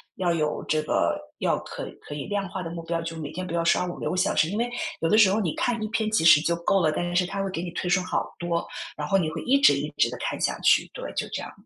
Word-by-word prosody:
要 175 Hz, -2 st, +1 dB
有 150 Hz, -2 st, -1 dB
这 155 Hz, 0 st, +1 dB
个 155 Hz, -, 0 dB, 0.2 s
要 -, -, +1 dB
可 -, -, -7 dB, 0.2 s
可 145 Hz, -, -8 dB
以 145 Hz, -, -5 dB
量 200 Hz, -2 st, -2 dB
化 185 Hz, -, -5 dB
的 165 Hz, -, -5 dB
目 170 Hz, -1 st, -5 dB
标， 165 Hz, 0 st, -2 dB
就 165 Hz, 0 st, -5 dB
每 150 Hz, -2 st, -5 dB
天 185 Hz, +2 st, -5 dB
不 170 Hz, -, -6 dB
要 170 Hz, -, +1 dB
刷 170 Hz, -, +3 dB
5-6 175 Hz, -, -4 dB
个 180 Hz, -, -2 dB
小 -, -, +2 dB
时， 160 Hz, -, +3 dB
因 205 Hz, -, -3 dB
为 235 Hz, +2 st, +1 dB, 0.3 s
有 165 Hz, -, +1 dB
的 215 Hz, -, +4 dB
时 205 Hz, -4 st, +7 dB
候 215 Hz, -, +1 dB
你 175 Hz, -7 st, -1 dB
看 240 Hz, -2 st, 0 dB
1 -, -, -1 dB
篇 215 Hz, 0 st, 0 dB
其 215 Hz, -7 st, +2 dB
实 155 Hz, -2 st, +8 dB
就 170 Hz, +1 st, +1 dB
够 175 Hz, +3 st, +1 dB
了， 155 Hz, -, +3 dB
但 175 Hz, +3 st, -2 dB
是 180 Hz, -, +3 dB
它 195 Hz, 0 st, -3 dB
会 195 Hz, -, -2 dB
给 170 Hz, -, -3 dB
你 175 Hz, -, -4 dB
推 180 Hz, -, -4 dB
送 185 Hz, 0 st, +3 dB
好 185 Hz, -, -2 dB
多， 170 Hz, -1 st, -1 dB, 0.3 s
然 150 Hz, 0 st, -3 dB
后 195 Hz, -, +3 dB
你 160 Hz, -4 st, 0 dB
会 160 Hz, 0 st, -5 dB
一 275 Hz, +3 st, +3 dB
直 -, -, +7 dB
一 -, -, -2 dB
直 -, -, +4 dB
地 -, -, -6 dB
看 -, -, -3 dB
下 -, -, 0 dB
去， -, -, +4 dB
对， -, -, -7 dB
就 -, -, -1 dB
这 -, -, -3 dB
样。 -, -, -8 dB
175 Hz, 320 characters per minute, -26 LUFS, 165-195 Hz, 0.3 s, 实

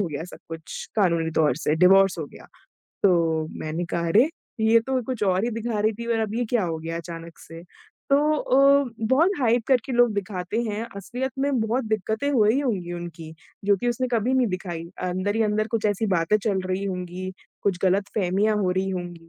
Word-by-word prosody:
हो 200 Hz, -, +1 dB
गया 150 Hz, +2 st, -5 dB
सब 180 Hz, -, -11 dB
कुछ 165 Hz, -1 st, -7 dB
कानूनी 170 Hz, -5 st, +2 dB
तौर 150 Hz, -5 st, +3 dB
से, 155 Hz, -1 st, 0 dB
डिवोर्स 190 Hz, +1 st, +5 dB
हो 155 Hz, -, -3 dB
गया। -, -, -15 dB, 0.6 s
तो 165 Hz, -4 st, +3 dB
मैंने 160 Hz, +3 st, -3 dB
कहा, 170 Hz, 0 st, -2 dB
"अरे! 225 Hz, -, +5 dB, 0.3 s
ये 220 Hz, +1 st, +5 dB
तो 260 Hz, +3 st, -1 dB
कुछ 250 Hz, -4 st, -4 dB
और 190 Hz, +1 st, +2 dB
ही 240 Hz, -, -1 dB
दिखा 230 Hz, -1 st, -2 dB
रही 215 Hz, +1 st, +2 dB
थी 235 Hz, -, -5 dB
और -, -, 0 dB
अब 215 Hz, 0 st, -2 dB
ये 245 Hz, -, 0 dB
क्या 235 Hz, -5 st, +2 dB
हो 165 Hz, -2 st, -3 dB
गया 165 Hz, +1 st, -5 dB
अचानक 165 Hz, 0 st, -8 dB
से?" 165 Hz, +1 st, -11 dB, 0.5 s
तो 275 Hz, -, +6 dB, 0.2 s
अ, 275 Hz, 0 st, +4 dB
बहुत 265 Hz, -, +3 dB
हाइप 240 Hz, -1 st, +3 dB
करके 260 Hz, -1 st, +2 dB
लोग 240 Hz, -2 st, +4 dB
दिखाते 200 Hz, +1 st, -3 dB
हैं, 220 Hz, 0 st, -3 dB
असलियत 250 Hz, +6 st, -4 dB
में 270 Hz, -3 st, +1 dB
बहुत 230 Hz, +3 st, 0 dB
दिक्कतें 220 Hz, +5 st, -1 dB
हुई 225 Hz, +1 st, +3 dB
होंगी 195 Hz, -10 st, -2 dB
उनकी, 165 Hz, -2 st, -8 dB, 0.3 s
जो 200 Hz, 0 st, +4 dB
कि 240 Hz, +6 st, -2 dB
उसने 250 Hz, +1 st, -1 dB
कभी 235 Hz, +3 st, +1 dB
नहीं 255 Hz, -2 st, +3 dB
दिखाई। 175 Hz, -3 st, -4 dB, 0.2 s
अंदर 185 Hz, +4 st, -1 dB
ही 225 Hz, -, +3 dB
अंदर 215 Hz, 0 st, +1 dB
कुछ 225 Hz, -1 st, -2 dB
ऐसी 205 Hz, +2 st, 0 dB
बातें 170 Hz, +4 st, +3 dB
चल 200 Hz, -2 st, 0 dB
रही 185 Hz, +2 st, -2 dB
होंगी, 180 Hz, -1 st, -4 dB, 0.3 s
कुछ 195 Hz, -3 st, 0 dB
गलतफ़हमियाँ 195 Hz, +2 st, +1 dB
हो 190 Hz, -3 st, +1 dB
रही 190 Hz, +1 st, -1 dB
होंगी 175 Hz, -2 st, -6 dB
200 Hz, 200 wpm, -24 LUFS, 175-230 Hz, 0.6 s, तो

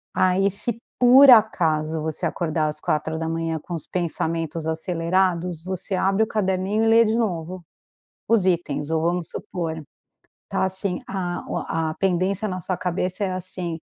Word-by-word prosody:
aí 185 Hz, +2 st, +3 dB
se 220 Hz, +4 st, 0 dB, 0.2 s
por 260 Hz, +2 st, +8 dB
acaso 160 Hz, -9 st, +3 dB
você 155 Hz, 0 st, -2 dB
acordar 160 Hz, -2 st, -1 dB
às 150 Hz, 0 st, -4 dB
4 160 Hz, +1 st, -1 dB
da 160 Hz, 0 st, -3 dB
manhã 165 Hz, 0 st, -2 dB
com 175 Hz, -, -8 dB
os 165 Hz, -3 st, -5 dB
pensamentos 165 Hz, -2 st, -2 dB
acelerados 170 Hz, +1 st, 0 dB
você 190 Hz, +1 st, -3 dB
abre 195 Hz, +3 st, +1 dB
o 220 Hz, -, +3 dB
caderninho 195 Hz, 0 st, 0 dB
e -, -, +2 dB
lê 230 Hz, +1 st, +6 dB
de 220 Hz, +1 st, +1 dB
novo, 180 Hz, -5 st, -3 dB, 0.6 s
os 220 Hz, -5 st, +3 dB
itens 160 Hz, -5 st, 0 dB
ou 160 Hz, 0 st, 0 dB
vamos 175 Hz, 0 st, -1 dB
supor, 170 Hz, -6 st, -5 dB, 0.7 s
está -, -, -1 dB
assim, 190 Hz, -1 st, -2 dB
a 180 Hz, -3 st, -4 dB
o -, -, -3 dB
a 160 Hz, -1 st, -2 dB
pendência 190 Hz, +2 st, 0 dB
na 185 Hz, -2 st, -4 dB
sua 185 Hz, +1 st, -3 dB
cabeça 185 Hz, +2 st, -2 dB
é 190 Hz, -, -1 dB
assim, 180 Hz, -2 st, -4 dB
180 Hz, 165 wpm, -23 LUFS, 165-195 Hz, 0.7 s, por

